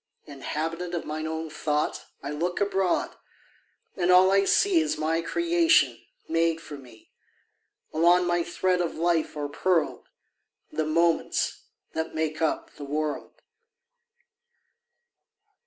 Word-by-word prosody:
Inhabitant 165 +5 -4
of 170 - -3
mine 155 +1 -4
own 160 0 -4
thought, 150 -1 -1 0.2
I 140 - -4
look 170 +4 -2
abroad, 195 -2 0 0.8
and 180 -1 0
all 185 +1 +7
I 195 0 +4
see 380 - +4
Is 315 -1 0
my 160 +2 0
creation, 335 - +2 0.3
made 165 0 +1
for 155 -3 -9
me: 125 -5 -15 0.8
Along 175 +3 +4
my 175 -1 +1
thread 180 +1 0
of 170 - -2
life 165 -2 0
are 145 -1 -2
pearled 165 +2 0 0.6
The 155 - -1
moments 165 - +1 0.3
that 160 0 -3
make 155 -1 -2
up 160 - -1
the 145 - -8
world. 150 +1 -4
165 Hz, 125 wpm, -26 LUFS, 155-180 Hz, 0.8 s, all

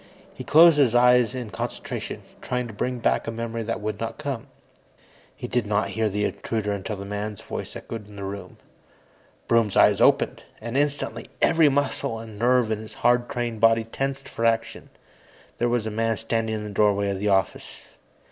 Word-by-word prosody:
He - - -8
closed 160 0 +7
his 125 -5 +4
eyes 125 0 +5
in 120 -4 -5
concentration, 90 - -5 0.2
trying 125 0 -2
to 115 - -8
bring 125 +5 -2
back 115 - 0
a - - -1
memory 115 0 -4
that 115 0 -3
would 105 -1 -3
not 115 - -4
come. 140 -4 -4 0.9
He - - -6
did 120 -3 -1
not 105 0 0
hear 110 -1 0
the 105 +1 -2
intruder 110 -1 -2
until 100 +1 -3
the 100 0 -7
man's 105 +1 -5
voice - - -6
echoed 110 -3 -7
in 105 - -14
the 100 - -7
room. 100 0 -7 0.9
Broom's 115 -4 +2
eyes - - +5
opened, - - +3 0.2
and 115 +2 -6
instantly 140 -5 -1
every 165 -2 +5
muscle 140 -4 -1
and 110 -2 -10
nerve 120 -1 +3
in 110 - -1
his 110 0 -10
hard 120 +1 +3
trained 120 -5 -3
body 115 0 +5
tensed 135 +4 -4
for 115 - -5
action. 115 0 0 0.7
There 120 - +2
was 120 -2 0
a 110 - -3
man 115 +1 0
standing 115 -1 -1
in 105 - -4
the 105 - -6
doorway 100 0 +2
of 95 - -3
the 105 +1 0
office. 95 -1 -1
115 Hz, 190 wpm, -24 LUFS, 105-125 Hz, 0.9 s, closed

